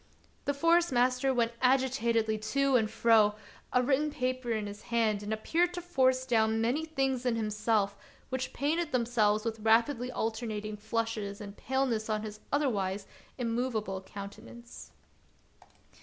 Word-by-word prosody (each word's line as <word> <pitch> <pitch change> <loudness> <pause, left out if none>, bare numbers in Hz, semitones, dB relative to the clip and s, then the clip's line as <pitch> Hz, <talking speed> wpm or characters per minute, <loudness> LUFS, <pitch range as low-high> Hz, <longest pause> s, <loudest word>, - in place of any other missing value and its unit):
The 285 - 0
Forest 335 +3 +3
master 255 +2 +2
went 235 -2 +1
agitatedly 240 -4 +2
to 275 +5 +1
and 220 -3 +3
fro, 220 -2 +4 0.4
a 250 - +3
written 290 +4 +2
paper 255 -4 -2
in 215 -2 -1
his 205 0 -8
hand, 225 -3 +1
and 205 +1 -5
appeared 340 +11 +1
to 355 - -4
force 260 -6 +2
down 220 -3 +2
many 250 +8 0
things 270 -5 -1
in 245 -2 +1
himself 210 -2 0 0.3
which 260 0 -3
painted 310 +2 -1
themselves 225 -3 +2
with 225 -1 -2
rapidly 235 +3 +2
alternating 220 -2 -3
flushes 220 -1 -3
and 200 -1 -8
paleness 250 -4 -1
on 215 0 -1
his 215 -1 -7
otherwise 205 -9 0 0.3
immovable 230 -5 -2
countenance. 215 +5 -10
235 Hz, 140 wpm, -30 LUFS, 215-260 Hz, 0.4 s, fro